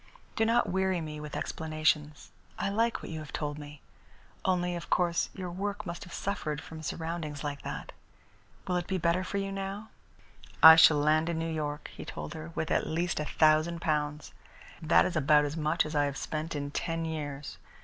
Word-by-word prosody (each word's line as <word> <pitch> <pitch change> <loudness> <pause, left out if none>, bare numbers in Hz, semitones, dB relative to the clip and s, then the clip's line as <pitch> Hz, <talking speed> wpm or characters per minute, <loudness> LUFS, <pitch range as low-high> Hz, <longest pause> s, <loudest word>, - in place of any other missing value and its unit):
Do 225 - +2
not 235 +2 +3
weary 190 -1 +1
me 155 -2 -6
with 150 0 -7
explanations. 155 -2 -1 0.3
I - - -1
like 230 +3 0
what - - -7
you 160 - -4
have 155 -2 -9
told 150 -1 -3
me. 145 -1 -10 0.6
Only, 180 -1 +1
of 170 - -7
course, 175 -2 +2
your 185 -2 -5
work 205 +3 -3
must 175 -1 -6
have 180 - -13
suffered 155 -7 -2
from 160 0 -9
surroundings 160 -2 -4
like 145 -1 -4
that. - - -6 0.7
Will 180 - 0
it 175 - -3
be 190 - 0
better 175 +1 +1
for 200 - -3
you 195 0 -2
now?" 195 +2 -5 0.7
"I 160 0 +13
shall 160 -2 +7
land 155 +2 +3
in 170 - -1
New 165 0 -2
York," 150 -1 -4
he - - -8
told - - -6
her, 160 +1 -7
"with 160 - -2
at - - +1
least 170 +1 -1
a 150 - -1
thousand 155 +2 +3
pounds. 150 -1 -1 0.5
That 85 0 +5
is 180 - -2
about 150 0 +4
as 145 +1 -3
much 160 +1 +1
as 155 - -5
I 145 -1 +3
have 140 -1 -3
spent 155 +3 -4
in 145 0 -3
ten 165 +1 -2
years. 145 -3 -5
160 Hz, 200 wpm, -30 LUFS, 150-175 Hz, 0.7 s, I